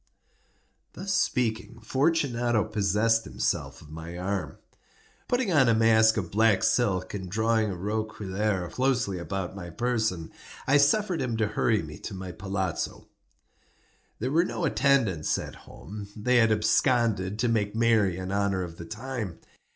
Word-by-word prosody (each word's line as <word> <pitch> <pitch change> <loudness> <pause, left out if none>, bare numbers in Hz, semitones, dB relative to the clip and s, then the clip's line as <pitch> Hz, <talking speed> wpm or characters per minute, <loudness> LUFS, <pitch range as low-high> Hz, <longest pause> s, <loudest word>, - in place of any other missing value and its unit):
Thus 195 0 -3
speaking, 120 -8 0
Fortunato 120 -4 +1
possessed 110 +2 +1
himself 65 -3 -3
of 75 - -15
my 80 +2 -7
arm. 95 +1 -3 0.7
Putting 245 -6 0
on 135 -6 +5
a 115 - +4
mask 110 0 +5
of 90 -6 -3
black 110 -1 +3
silk, 95 -7 +1
and 95 -3 -5
drawing 110 +2 +1
a 95 - -3
roquelaire 105 -1 -2
closely 125 -8 0
about 95 +1 -4
my 90 -3 -7
person, 110 -5 -1 0.3
I 140 +2 +4
suffered 180 +5 +2
him 120 -3 -1
to 110 -2 +1
hurry 105 -1 +1
me 75 -1 -9
to 105 - -7
my 95 -1 -6
palazzo. 95 -1 -4 1.1
There 125 +4 -2
were 165 +3 +4
no 180 - -2
attendants 115 - +2
at - - -6
home; 100 +7 -10
they 125 +4 +2
had 115 -2 +4
absconded 110 -2 +2
to 120 +2 +1
make 110 -3 0
merry 110 -6 +3
in 95 0 -5
honor 100 -2 0
of 85 -1 -8
the 85 - -8
time. 110 -3 -5
110 Hz, 150 wpm, -27 LUFS, 95-120 Hz, 1.1 s, on